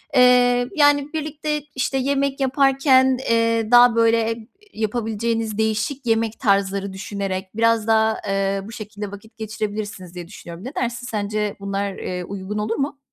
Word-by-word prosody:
Eee, 245 -1 +5
yani, 290 -1 +3
birlikte, 300 -1 -3
işte, 265 +1 0
yemek 275 +1 0
yaparken, 265 -1 +4
eee, 230 -1 +2
daha 245 -1 +7
böyle, 230 0 +3
iii, 225 -1 -13 0.3
yapabileceğiniz 225 0 -2
değişik 220 +5 -1
yemek 225 -1 0
tarzları 200 -3 +1
düşünerek 190 0 -4
biraz 230 -1 +2
daha, 220 0 +3
eee, 195 0 0
bu 210 - -10
şekilde 210 -2 -7
vakit 220 +3 -12
geçirebilirsiniz 210 -4 -5
diye 175 -1 -7
düşünüyorum. 175 0 -10
Ne 265 - -7
dersin? 240 0 -3
Sence 210 -2 -2
bunlar, 200 0 -2
eee, 180 -1 -4
uygun 195 +2 -5
olur 215 +2 -1
mu? 275 +1 -3
225 Hz, 145 wpm, -22 LUFS, 205-250 Hz, 0.3 s, daha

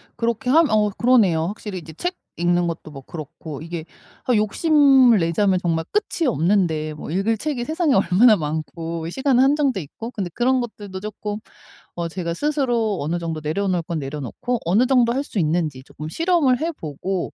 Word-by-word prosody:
그렇게 230 +1 -1
하면 315 +3 +5
어 210 -1 +3
그러네요. 205 -8 +3
확실히 205 0 -6
이제 160 -1 -11
책 355 - -3 0.2
읽는 175 +1 +2
것도 165 -2 -6
뭐 135 -2 -9
그렇고 150 0 -8
이게 165 0 -6 0.4
아 250 - +2
욕심을 265 - +5
내자면 185 +3 +2
정말 165 -2 0
끝이 370 -6 0
없는데 165 -7 +1
뭐 150 - -8
읽을 195 +7 0
책이 275 0 -2
세상에 315 +1 +1
얼마나 200 +4 +5
많고 160 +1 -4
시간은 265 +5 +2
한정돼 275 -6 +2
있고 225 - -8
근데 195 -7 -4
그런 255 +4 +2
것들도 205 -5 -6
쪼끔 210 0 -5 0.6
어 170 -1 -2
제가 170 0 -4
스스로 240 - 0
어느 165 +4 -1
정도 165 -2 -4
내려놓을 180 +3 0
건 165 -1 -3
내려놓고 150 - -4
어느 200 +9 +3
정도 245 -3 +4
할 270 +3 -1
수 210 - -3
있는지 155 -5 0
쪼끔 150 +3 -9
실험을 310 - +2
해보고 190 - -3
195 Hz, 365 characters per minute, -22 LUFS, 165-250 Hz, 0.6 s, 하면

